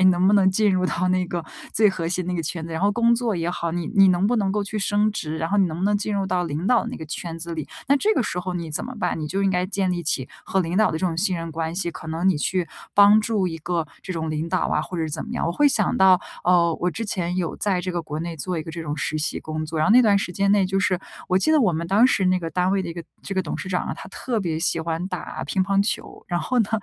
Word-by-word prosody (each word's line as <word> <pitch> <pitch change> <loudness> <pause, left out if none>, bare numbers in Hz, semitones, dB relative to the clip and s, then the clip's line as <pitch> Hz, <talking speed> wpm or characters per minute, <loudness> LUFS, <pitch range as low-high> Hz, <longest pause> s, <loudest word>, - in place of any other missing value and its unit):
哎， - - +4
能 185 0 +4
不 200 - +5
能 190 -2 +5
进 210 +2 +3
入 185 0 +1
到 185 0 0
那 185 0 +2
个 175 -1 -4 0.3
最 215 0 +4
核 170 -4 -2
心 180 0 -2
那 180 - -2
个 170 - -1
圈 160 +1 -4
子， 165 - -7
然 160 - -3
后 200 - +4
工 235 +2 +3
作 230 -5 -1
也 170 +1 -1
好， 170 -1 -2
你 170 -1 -3
你 195 -2 +7
能 185 +1 +3
不 240 - +2
能 200 -3 +1
够 205 +1 -1
去 205 +2 -5
升 205 +1 +2
职， 160 -6 -4
然 165 +1 -2
后 205 - 0
你 195 -2 +4
能 160 -1 -5
不 185 - -1
能 205 +1 +3
进 210 +1 -3
入 195 -1 0
到 180 -1 0
领 160 +2 -3
导 245 +1 +4
的 - - -5
那 250 - -6
个 160 - -8
圈 165 +2 -5
子 170 0 -5
里， 155 -3 -5 0.2
那 280 - +5
这 420 +9 +2
个 - - +2
时 180 -5 -2
候 180 0 -4
你 170 -2 -4
怎 150 - -2
么 255 - -7
办？ - - -1
你 155 - -3
就 195 +5 -1
应 195 - +3
该 180 -1 +1
建 195 -1 -1
立 175 -1 -2
起 135 -5 -1 0.2
和 190 - 0
领 175 0 -2
导 215 +1 +4
的 160 - -2
这 185 - 0
种 165 -2 -2
信 185 0 +1
任 165 0 -5
关 160 +1 -3
系。 175 -2 -1
可 160 - -10
能 165 +4 0
你 185 - +3
去 180 +3 0 0.3
帮 205 +1 +7
助 210 -3 0
一 165 - -6
个 165 0 -2 0.2
这 185 - -5
种 160 -2 -3
领 155 +2 -2
导 185 +1 0
啊， - - +1
或 180 - -6
者 165 - -1
是 160 - -2
怎 - - -4
么 - - -8
样。 - - -1
我 - - 0
会 290 +11 +3
想 215 -7 +1
到， 190 -1 +6 0.2
呃， 175 -1 +4
我 180 - +1
之 225 +5 -4
前 180 -4 -2
有 175 -3 -2
在 195 -3 0
这 185 - -3
个 175 - -1
国 155 -2 -5
内 170 0 -5
做 180 +3 -3
一 155 - -3
个 160 - -8
这 170 +1 -6
种 150 -1 -4
实 155 +2 -2
习 155 - -1
工 155 0 -4
作， 160 +1 -4
然 155 - +2
后 - - +5
那 250 - +8
段 210 -4 +4
时 195 - -3
间 195 +2 +1
内 205 -2 +4
就 190 +1 0
是， 185 -3 +1 0.3
我 185 - +3
记 255 - +1
得 310 - +5
我 205 -8 +3
们 170 +1 -2
当 205 +7 +5
时 200 -7 +2
那 185 0 +3
个 165 -2 -4
单 180 +3 +1
位 195 0 +1
的 175 - -5
一 - - -4
个 170 0 -7 0.2
这 195 - -5
个 190 - +1
董 160 - -4
事 190 - -5
长 180 -1 0
啊， - - -3
他 - - -10
特 235 +3 -3
别 165 -5 -2
喜 165 0 +1
欢 165 +1 -2
打 180 -2 -5
乒 190 - 0
乓 195 +1 +2
球， 205 - -4
然 175 -1 0
后 255 - 0
呢， 210 - +1
180 Hz, 350 characters per minute, -23 LUFS, 165-200 Hz, 0.3 s, 那